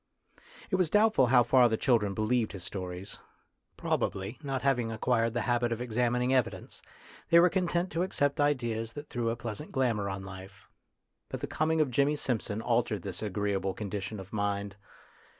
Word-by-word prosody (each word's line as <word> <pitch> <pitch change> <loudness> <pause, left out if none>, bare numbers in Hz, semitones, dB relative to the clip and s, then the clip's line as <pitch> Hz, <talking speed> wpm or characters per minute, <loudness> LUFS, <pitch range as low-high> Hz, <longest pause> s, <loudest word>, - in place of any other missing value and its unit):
It 185 - +2
was 180 -4 +2
doubtful 210 - +4
how 120 0 +6
far 125 0 +5
the 110 - 0
children 110 -7 +2
be 110 - -1
lieved 115 0 +1
his 95 -3 -7
stories; 90 0 -6 0.6
probably, 95 +5 -2
not 135 -3 -3
having 125 -4 +1
ac 110 - -4
quired 115 0 +1
the 120 - +1
habit 120 +1 +1
of 115 - -2
examining 125 +1 0
evidence, 130 -3 -1 0.5
they 170 - +7
were 175 0 +5
content 180 -1 0
to 165 - -1
accept 145 -6 0
ideas 120 -6 0
that 145 +4 -8
threw 120 -2 -1
a 115 - -1
pleasant 120 +5 -6
glamour 115 -7 0
on 95 0 -5
life. 95 0 -11 0.6
But - - -5
the - - -1
coming 160 +1 +1
of 145 -4 +1
Jimmy 140 +4 +2
Simpson 115 -5 -2
altered 115 -5 0
this 95 -3 -5
agreeable 100 -2 -1
con 100 -2 -5
dition 105 +1 -4
of 95 +2 -11
mind. 100 -1 -2
120 Hz, 185 wpm, -30 LUFS, 105-135 Hz, 0.6 s, they